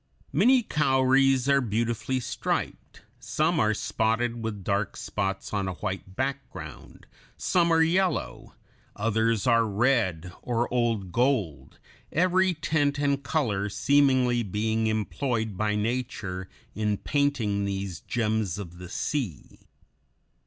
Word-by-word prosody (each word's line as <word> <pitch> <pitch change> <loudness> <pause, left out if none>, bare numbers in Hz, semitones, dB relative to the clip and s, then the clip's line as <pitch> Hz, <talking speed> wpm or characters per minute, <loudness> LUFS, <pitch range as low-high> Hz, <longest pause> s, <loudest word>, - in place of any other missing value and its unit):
Many 255 -1 +5
cowries 135 - +3
are 140 0 +4
beautifully 115 +3 -1
striped; 125 0 -4 0.2
some 160 +2 0
are 110 -2 +2
spotted 115 +2 0
with 105 -3 -4
dark 100 +1 -1
spots 95 -1 -3
on 100 -2 0
a 95 - -2
white 95 -1 -5
background; 135 +1 -5 0.3
some 170 -2 +2
are 165 0 +5
yellow; 180 +1 -1 0.4
others 110 0 +1
are 115 -2 +4
red 100 -6 +1
or 120 -1 0
old 115 -6 0
gold, 120 - 0 0.3
every 185 +2 +2
tint 145 -2 0
and 140 -1 +1
color 110 -10 -1
seemingly 130 -1 +3
being 110 +2 -1
employed 110 0 -1
by 105 +2 0
nature 105 -5 -3 0.2
in 105 -1 0
painting 120 -9 0
these 95 -3 -3
gems 110 -6 -1
of 90 -4 -8
the 90 -1 -9
sea. 110 - -4
115 Hz, 115 wpm, -27 LUFS, 105-140 Hz, 0.4 s, Many